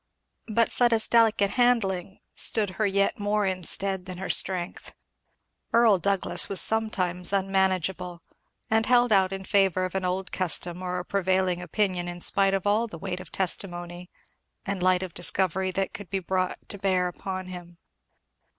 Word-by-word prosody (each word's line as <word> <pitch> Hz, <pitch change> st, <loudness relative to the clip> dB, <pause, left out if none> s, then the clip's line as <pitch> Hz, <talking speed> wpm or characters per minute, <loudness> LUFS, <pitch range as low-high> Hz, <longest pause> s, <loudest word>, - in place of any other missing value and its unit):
But 230 Hz, +1 st, +1 dB
Fleda's 230 Hz, -3 st, +2 dB
delicate 225 Hz, -3 st, +3 dB
handling 200 Hz, -7 st, 0 dB
stood 210 Hz, -4 st, +2 dB
her 215 Hz, -, +3 dB
yet 200 Hz, +1 st, 0 dB
more 205 Hz, 0 st, 0 dB
in 185 Hz, -1 st, -2 dB
stead 190 Hz, +1 st, 0 dB
than 185 Hz, -1 st, -7 dB
her 190 Hz, -, -2 dB
strength. 180 Hz, -2 st, +1 dB, 0.8 s
Earl 230 Hz, -4 st, +4 dB
Douglass 195 Hz, +1 st, 0 dB
was 195 Hz, -, +1 dB
sometimes 185 Hz, -5 st, -1 dB
unmanageable, 190 Hz, -3 st, -1 dB, 0.4 s
and 220 Hz, 0 st, +1 dB
held 245 Hz, -1 st, +4 dB
out 190 Hz, -2 st, +4 dB
in 195 Hz, 0 st, -6 dB
favour 190 Hz, -3 st, +2 dB
of 185 Hz, -, -6 dB
an 190 Hz, -1 st, -2 dB
old 185 Hz, +1 st, -3 dB
custom 180 Hz, -1 st, -1 dB
or 180 Hz, 0 st, -3 dB
a 180 Hz, -, -5 dB
prevailing 185 Hz, -2 st, 0 dB
opinion 180 Hz, 0 st, -1 dB
in 175 Hz, 0 st, -6 dB
spite 195 Hz, +2 st, +3 dB
of 195 Hz, -, -3 dB
all 215 Hz, +3 st, +2 dB
the 190 Hz, -, -9 dB
weight 180 Hz, +1 st, -5 dB
of 185 Hz, -, -12 dB
testimony 175 Hz, -1 st, -2 dB, 0.6 s
and 195 Hz, -2 st, -3 dB
light 185 Hz, 0 st, +2 dB
of 180 Hz, -3 st, -7 dB
discovery 185 Hz, +1 st, 0 dB
that 190 Hz, +1 st, -2 dB
could 205 Hz, -3 st, -8 dB
be 195 Hz, -, -1 dB
brought 185 Hz, 0 st, -2 dB
to 200 Hz, -, -6 dB
bear 185 Hz, -2 st, +1 dB
upon 185 Hz, +1 st, -6 dB
him. 175 Hz, -2 st, -10 dB
190 Hz, 165 wpm, -26 LUFS, 180-200 Hz, 0.8 s, Earl